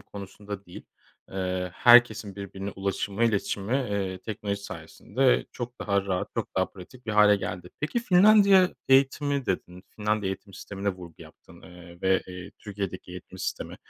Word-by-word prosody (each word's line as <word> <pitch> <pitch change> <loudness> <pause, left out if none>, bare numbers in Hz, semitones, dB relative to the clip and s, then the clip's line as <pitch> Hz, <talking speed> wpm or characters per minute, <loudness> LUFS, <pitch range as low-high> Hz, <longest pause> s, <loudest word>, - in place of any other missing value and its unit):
konusunda 100 0 -9
değil, 90 - -12 0.4
eee, 90 -1 -2
herkesin 120 -4 +5
birbirine 100 0 -6
ulaşımı, 100 +3 -2
iletişimi, 105 -1 -1
eee, 100 -8 -2
teknoloji 100 0 -4
sayesinde 130 +5 0
çok 120 0 -6
daha 100 -1 0
rahat, 90 -1 -1
çok - - -4
daha - - +3
pratik 120 +7 -14
bir 110 - -2
hâle 105 -1 +6
geldi. 90 -2 -6
Peki 155 +10 -1
Finlandiya 200 -2 +6
eğitimi 135 0 +3
dedin, 90 0 -3
Finlandiya 105 -2 0
eğitim 100 +1 -11
sistemine 100 0 -5
vurgu 90 -4 -6
yaptın, - - -17
eee, 85 -1 -13
ve, 95 0 +3
eee, 90 0 -9
Türkiye'deki 100 -3 -6
eğitim 90 -1 -10
sistemi. - - -4
100 Hz, 145 wpm, -27 LUFS, 95-120 Hz, 0.4 s, hâle